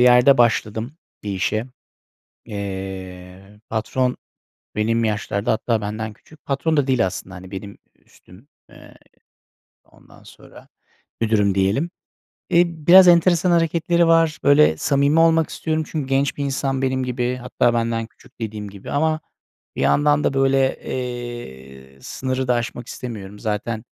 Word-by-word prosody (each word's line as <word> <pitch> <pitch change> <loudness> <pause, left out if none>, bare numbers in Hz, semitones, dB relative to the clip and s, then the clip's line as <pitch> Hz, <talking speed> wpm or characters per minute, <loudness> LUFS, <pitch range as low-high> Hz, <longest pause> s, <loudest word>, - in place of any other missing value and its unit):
yerde 125 +2 +6
başladım 115 +3 +1 0.3
bir 105 - -4
işe. 110 +4 -1 0.8
Eee, 95 -1 -7
patron 125 +3 -1 0.6
benim 115 +2 +1
yaşlarda, 105 -1 -1
hatta 115 0 0
benden 110 +1 -4
küçük. 155 +7 -21
Patron 150 +3 0
da 140 -2 +2
değil 130 -6 +2
aslında, 95 +1 -6
hani, 90 +1 -11
benim 100 +1 -7 0.2
ü - - -34
üstüm. 95 +10 -19 0.2
Eee, - - -16 0.9
ondan - - -21
sonra, - - -16 0.5
müdürüm 105 -3 +2
diyelim. 100 - +1 0.6
Eee, 170 - +5
biraz 170 +3 +6
enteresan 175 0 +4
hareketleri 170 0 +2
var. 165 -1 +3
Böyle 140 - +5
samimi 140 - +2
olmak 165 -1 +4
istiyorum 160 -1 -2
çünkü 150 -5 -4
genç 135 +1 +1
bir 145 - -2
insan 135 -1 -2
benim 130 -1 0
gibi. 125 0 -2
Hatta 125 -1 0
benden 115 -1 -1
küçük 115 - -23
dediğim 105 -2 -5
gibi 100 -1 -10
ama 155 +2 +1 0.6
bir - - -3
yandan 145 0 +3
da - - +1
böyle, 135 0 +3 0.2
eee, 70 - -7
sınırı 130 0 -3
da 125 - +3
aşmak 120 0 -4
istemiyorum. 105 -5 -7
Zaten, 110 +2 -3
120 Hz, 140 wpm, -21 LUFS, 105-140 Hz, 0.9 s, yerde